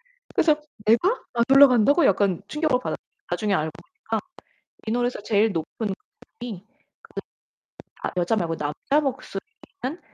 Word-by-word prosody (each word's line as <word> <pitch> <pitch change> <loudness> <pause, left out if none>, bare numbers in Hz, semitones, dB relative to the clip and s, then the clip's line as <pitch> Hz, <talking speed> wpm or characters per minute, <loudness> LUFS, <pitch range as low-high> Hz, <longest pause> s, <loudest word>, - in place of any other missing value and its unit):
올라가는데 - - -25
그래서 310 -2 +4 0.3
'내가? 345 - +3
안 235 -1 +3
올라간다고?' 275 +3 +7
약간 195 -2 +2
충격을 300 -4 +1
받았어요. - - -2 0.3
나중에 210 -2 0
알고 155 -3 0
보니까 225 - -5 0.7
이 - - 0
노래에서 245 -1 0
제일 210 +1 +3
높은 195 +5 -3 0.5
음이 210 -6 -6 0.4
그 - - -7 0.8
나 - - -2
여자 180 +6 +2
말고 165 -5 -1
남자 150 - 0
목소리는 300 - -6
235 Hz, 330 characters per minute, -24 LUFS, 200-295 Hz, 0.8 s, 올라간다고